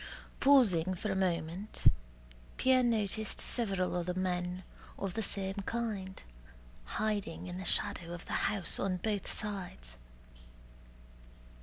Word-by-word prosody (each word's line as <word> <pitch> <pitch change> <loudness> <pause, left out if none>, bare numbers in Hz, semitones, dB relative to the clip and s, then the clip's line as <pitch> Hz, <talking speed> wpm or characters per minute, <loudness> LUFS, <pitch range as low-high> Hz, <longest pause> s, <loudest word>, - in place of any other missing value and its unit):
Pausing 195 -11 +5
for 205 +3 -2
a - - 0
moment, 180 +1 -1 0.7
Pierre 260 0 +5
noticed 220 -3 +1
several 195 -7 0
other 180 0 -1
men 180 0 -1 0.3
of 195 -2 -3
the 225 - -1
same 195 -2 -2
kind 210 -5 -3 0.7
hiding 210 -6 -1
in 180 0 -5
the 190 - -5
shadow 170 0 +1
of 175 -1 -7
the - - -5 0.2
house 200 -5 0
on 190 -2 0
both 205 +1 -2
sides. 180 - -6
190 Hz, 120 wpm, -33 LUFS, 180-215 Hz, 0.7 s, Pausing